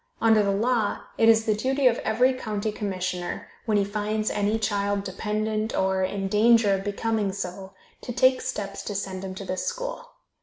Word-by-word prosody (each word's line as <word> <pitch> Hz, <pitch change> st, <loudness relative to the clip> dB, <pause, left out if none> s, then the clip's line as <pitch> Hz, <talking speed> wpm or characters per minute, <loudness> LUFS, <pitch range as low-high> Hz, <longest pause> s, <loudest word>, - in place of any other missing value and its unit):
Under 225 Hz, -1 st, +5 dB
the 200 Hz, -, +1 dB
law, 220 Hz, +1 st, 0 dB, 0.2 s
it 225 Hz, -, +6 dB
is 225 Hz, 0 st, +5 dB
the 215 Hz, -, +3 dB
duty 265 Hz, +6 st, 0 dB
of 245 Hz, -2 st, +4 dB
every 250 Hz, +4 st, +2 dB
county 215 Hz, -4 st, -3 dB
commissioner, 185 Hz, -4 st, -3 dB, 0.2 s
when 215 Hz, -2 st, +3 dB
he 200 Hz, -, +2 dB
finds 215 Hz, +1 st, -1 dB
any 205 Hz, +1 st, +1 dB
child 205 Hz, -2 st, 0 dB
dependent, 215 Hz, +3 st, -2 dB
or 190 Hz, 0 st, +1 dB
in 195 Hz, +1 st, -2 dB
danger 215 Hz, +1 st, +4 dB
of 195 Hz, 0 st, -1 dB
becoming 210 Hz, 0 st, -1 dB
so, 190 Hz, 0 st, -6 dB, 0.3 s
to 245 Hz, -, -6 dB
take 255 Hz, +1 st, +3 dB
steps 205 Hz, -6 st, -4 dB
to 205 Hz, -, -4 dB
send 190 Hz, -1 st, -4 dB
him 190 Hz, -1 st, -5 dB
to 195 Hz, -, -7 dB
this 185 Hz, 0 st, -3 dB
school. -, -, -4 dB
210 Hz, 185 wpm, -25 LUFS, 195-225 Hz, 0.3 s, it